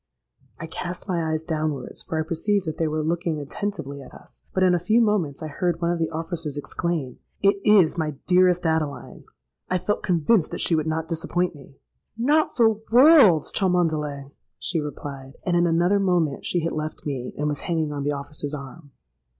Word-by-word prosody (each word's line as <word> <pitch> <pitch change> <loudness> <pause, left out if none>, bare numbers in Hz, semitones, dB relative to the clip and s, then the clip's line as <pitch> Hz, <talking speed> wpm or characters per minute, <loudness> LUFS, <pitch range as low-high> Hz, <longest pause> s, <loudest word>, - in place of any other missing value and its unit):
I 165 - -6
cast 175 +3 -6
my 170 -4 -1
eyes 155 0 -1
downwards, 155 -5 -3
for 160 - -4
I - - +1
perceived 195 +4 0
that 155 - -4
they 165 - +1
were 155 0 -1
looking 165 -1 -1
attentively 145 -2 -5
at 130 - -12
us; - - -15
but 185 - +1
in 185 -1 +5
a 175 - +2
few 215 +7 +2
moments 195 - +1
I - - -3
heard 170 +2 -1
one 170 0 +1
of 175 - -1
the 160 - 0
officers 165 -2 -4
exclaim, 150 -3 -3 0.2
'It 200 0 +4
is 190 -6 +5
my 155 -2 -2
dearest 180 -1 +3
Adeline! 160 -3 -2 0.4
I 185 - +2
felt 185 +4 -1
convinced 180 +1 +2
that - - -5
she - - +1
would 155 -1 +1
not 160 0 -2
disappoint 175 +1 -1
me.'—'Not 230 - -2
for 225 -3 +3
worlds, 245 - +7
Cholmondeley,' 155 -7 0 0.3
she 165 -3 -1
replied;—and, 145 +2 -5
in 175 0 +3
another 175 +4 +3
moment, 175 -7 0
she 175 - 0
had 165 - -2
left 155 0 -5
me 130 -4 -4
and 150 - -1
was 145 -2 -2
hanging 160 -3 -1
on 145 - -4
the 145 +1 0
officer's 145 +1 -4
arm. 145 +2 -10
165 Hz, 185 wpm, -24 LUFS, 150-180 Hz, 0.4 s, worlds